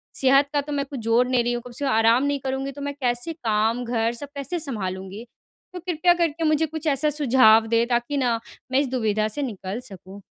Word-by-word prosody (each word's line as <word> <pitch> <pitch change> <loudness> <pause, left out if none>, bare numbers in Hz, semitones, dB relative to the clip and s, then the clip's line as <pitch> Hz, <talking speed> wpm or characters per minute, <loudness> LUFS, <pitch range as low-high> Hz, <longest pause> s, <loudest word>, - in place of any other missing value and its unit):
सेहत 275 +2 +4
का 290 - +2
तो 295 +1 -8
मैं 280 -1 -1
कुछ 270 -2 -7
जोड़ 230 +2 +2
नहीं 250 -2 +2
रही 240 - 0
हूँ, 240 - -3
कम 245 - -9
से 260 +4 -4
कम 270 - +1
आराम 225 +3 +4
नहीं 285 0 0
करूँगी 270 +1 -3
तो 285 +1 -10
मैं 285 0 -3
कैसे 245 +5 -1
काम 225 -3 0
घर 230 -1 0
सब 260 +4 -7
कैसे 280 +5 -4
सँभालूँगी? 195 - -5 0.5
तो 360 - -6
कृपया 350 0 +2
करके 330 -2 -1
मुझे 310 0 +2
कुछ 315 0 -6
ऐसा 290 +1 +2
सुझाव 250 -6 +4
दें 230 +1 +2
ताकि 240 +4 -1
ना 245 -4 +1 0.3
मैं 260 - +3
इस 280 - +1
दुविधा 215 -4 0
से 220 +7 -4
निकल 210 -5 -4
सकूँ। 195 +1 -12
255 Hz, 225 wpm, -23 LUFS, 230-285 Hz, 0.5 s, सेहत